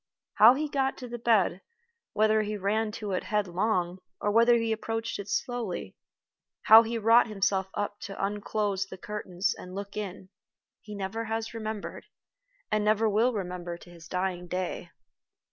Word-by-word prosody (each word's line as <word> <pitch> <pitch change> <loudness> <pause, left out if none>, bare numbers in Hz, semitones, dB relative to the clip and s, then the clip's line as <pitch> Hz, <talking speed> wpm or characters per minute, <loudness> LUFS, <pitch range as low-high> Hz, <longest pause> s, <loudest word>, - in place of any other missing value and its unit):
How 230 +4 +8
he 305 +2 -1
got 270 -2 0
to 250 - -7
the 240 0 -6
bed 215 -5 +2 0.5
whether 215 0 +3
he 210 0 -3
ran 210 +3 0
to 210 -2 -5
it 185 - -2
headlong, 185 -2 0 0.2
or 205 - 0
whether 235 +2 +5
he 230 -1 0
approached 225 0 -3
it 200 0 -7
slowly; 215 - -3 0.7
how 220 +1 +10
he 230 +1 -3
wrought 230 +2 +5
himself 195 -2 0
up 205 0 -3
to 195 0 -4
unclose 205 -1 -2
the 190 - -9
curtains 195 -2 -2
and 180 +1 -10
look 200 0 -6
in, 195 -2 -6 0.5
he 210 -1 -9
never 200 +3 -3
has 225 +1 -3
remembered, 220 -2 -5 0.6
and 215 0 +2
never 215 +1 +3
will 220 +4 +3
remember 180 -5 -4
to 175 - -15
his 170 -1 -13
dying 180 -1 -2
day. 180 +1 -3
210 Hz, 160 wpm, -28 LUFS, 190-225 Hz, 0.7 s, how